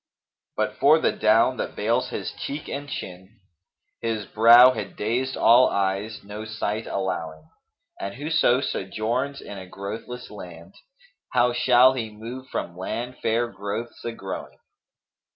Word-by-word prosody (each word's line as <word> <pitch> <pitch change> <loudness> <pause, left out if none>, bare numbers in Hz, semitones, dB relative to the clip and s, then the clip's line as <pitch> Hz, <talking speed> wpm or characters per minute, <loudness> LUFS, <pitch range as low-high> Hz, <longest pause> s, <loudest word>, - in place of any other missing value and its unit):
But - - -1
for - - +6
the - - +2
down - - +3
that - - -4
veils - - 0
his - - -4
cheek 145 +2 -6
and 145 +1 -5
chin, 95 -2 -8 0.3
* - - -54
His 115 -3 -2
brow 120 +3 +8
had 110 -4 -6
dazed 125 +5 -1
all 120 +2 +6
eyes 100 +3 -2
no 105 +2 -7
sight 110 0 -3
allowing: 80 -5 -4 0.5
And 100 0 -5
whoso 145 -3 +2
sojourns 120 +5 -2
in 100 - -8
a 95 - -10
growthless 110 +6 -7
land, 85 -5 -11 0.3
* - - -28
How 125 -1 +3
shall 125 +1 +5
he 115 -4 -3
move 115 +5 -9
from 85 -8 -4
land 120 +7 -5
fair 115 +2 +1
growths 100 +4 -6
a 115 - -3
growing?' 95 -4 -7
110 Hz, 150 wpm, -24 LUFS, 100-125 Hz, 0.5 s, brow